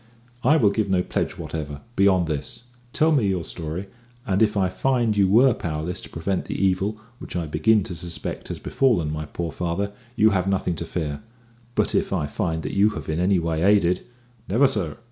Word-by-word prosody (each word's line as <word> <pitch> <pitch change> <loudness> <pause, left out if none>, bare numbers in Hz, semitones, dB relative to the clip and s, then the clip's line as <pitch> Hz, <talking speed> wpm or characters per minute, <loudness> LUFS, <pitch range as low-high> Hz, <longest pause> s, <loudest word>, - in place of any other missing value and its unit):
"I 155 - +5
will 105 -8 +4
give 105 -1 -1
no 90 -1 +2
pledge - - -2
whatever, 75 -3 -5
beyond 95 -3 +4
this. 75 +7 -4 0.3
Tell 160 +5 +3
me 130 -9 +3
your 95 -3 0
story, 80 +3 -4 0.4
and 100 -2 +1
if 105 -1 +3
I 95 -2 +3
find 115 +3 +1
you 100 -2 +4
were 120 +5 +6
powerless 80 +2 -4
to - - -10
prevent 90 +3 -2
the - - -4
evil 95 +2 +1 0.2
which - - -8
I 85 -2 -1
begin 80 +8 +3
to 90 - -6
suspect 85 0 -5
has - - -5
befallen 100 - +1
my 75 -1 -4
poor 85 +2 -4
father, 90 +5 -2 0.2
you 110 +1 +5
have 95 -1 0
nothing 95 -2 0
to 85 - -4
fear; 75 -4 -3 0.5
but - - +1
if - - +1
I 75 - 0
find 80 +1 -2
that - - -4
you 100 +2 +4
have 75 -2 -7
in 80 +1 -1
any 95 +2 +3
way 80 -2 -1
aided 90 -2 +3 0.2
" 120 -2 -27
"Never, 125 +8 +5
sir. 105 - -2
95 Hz, 205 wpm, -24 LUFS, 80-105 Hz, 0.5 s, were